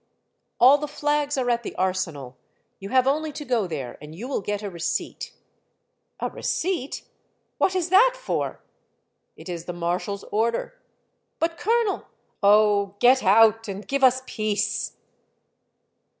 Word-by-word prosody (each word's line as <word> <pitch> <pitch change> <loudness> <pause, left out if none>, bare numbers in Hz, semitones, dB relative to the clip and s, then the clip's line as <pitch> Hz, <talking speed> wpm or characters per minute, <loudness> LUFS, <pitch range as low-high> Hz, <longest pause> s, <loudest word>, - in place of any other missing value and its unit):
" - - -51
All 270 +4 +7
the 300 - -3
flags 295 0 -1
are 255 -2 0
at 235 0 0
the - - -7
Arsenal. 170 -9 -2 0.4
You 195 - -7
have 255 +1 +3
only 305 +3 0
to 295 - -7
go 235 -7 0
there, 140 -7 -6
and 150 +1 -10
you 225 +9 -7
will 270 - -2
get 205 +2 -3
a 205 - -3
receipt." 170 -1 -3 0.5
" - - -51
A - - -1
receipt? 335 -6 -2 0.6
What 375 - +2
is 360 -2 0
that 480 +7 +5
for?" - - -3 0.4
" - - -50
It - - -12
is 170 -2 -5
the 175 - -5
marshal's 175 +4 -3
order." 230 - -1 0.6
"But, 330 0 -1
colonel 455 -2 0
— - - -43
" - - -43
" - - -51
Oh, 205 -1 +4
get 255 +4 +5
out! 225 +3 +5
and 200 +1 -6
give 275 0 -1
us 260 0 +5
peace." 215 -3 -2
225 Hz, 165 wpm, -24 LUFS, 195-290 Hz, 0.6 s, All